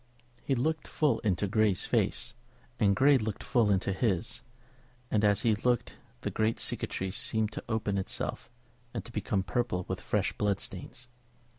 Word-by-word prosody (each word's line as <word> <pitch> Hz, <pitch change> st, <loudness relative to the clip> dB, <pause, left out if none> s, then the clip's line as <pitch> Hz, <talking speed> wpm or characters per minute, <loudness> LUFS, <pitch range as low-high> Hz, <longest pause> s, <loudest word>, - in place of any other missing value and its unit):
He 135 Hz, -, +1 dB
looked 155 Hz, +5 st, 0 dB
full 150 Hz, -2 st, +2 dB
into 100 Hz, -2 st, +1 dB
Grey's 105 Hz, -1 st, +2 dB
face, 115 Hz, 0 st, 0 dB, 0.5 s
and 100 Hz, -3 st, +4 dB
Grey 140 Hz, 0 st, +5 dB
looked 110 Hz, -2 st, -3 dB
full 120 Hz, -5 st, +3 dB
into 95 Hz, 0 st, +2 dB
his; 95 Hz, -4 st, 0 dB, 0.7 s
and 105 Hz, -1 st, +2 dB
as 105 Hz, 0 st, +4 dB
he 115 Hz, -, +3 dB
looked 120 Hz, +3 st, 0 dB, 0.2 s
the -, -, -2 dB
great 110 Hz, +1 st, +1 dB
cicatrice 95 Hz, +1 st, -1 dB
seemed 110 Hz, -1 st, 0 dB
to -, -, -6 dB
open 105 Hz, -3 st, 0 dB
itself 95 Hz, -, -4 dB, 0.5 s
and -, -, -3 dB
to -, -, -9 dB
become 105 Hz, -3 st, -1 dB
purple 100 Hz, -4 st, -1 dB
with -, -, -3 dB
fresh -, -, 0 dB
blood 100 Hz, -2 st, 0 dB
stains. 120 Hz, +6 st, -7 dB
110 Hz, 160 wpm, -30 LUFS, 100-120 Hz, 0.7 s, Grey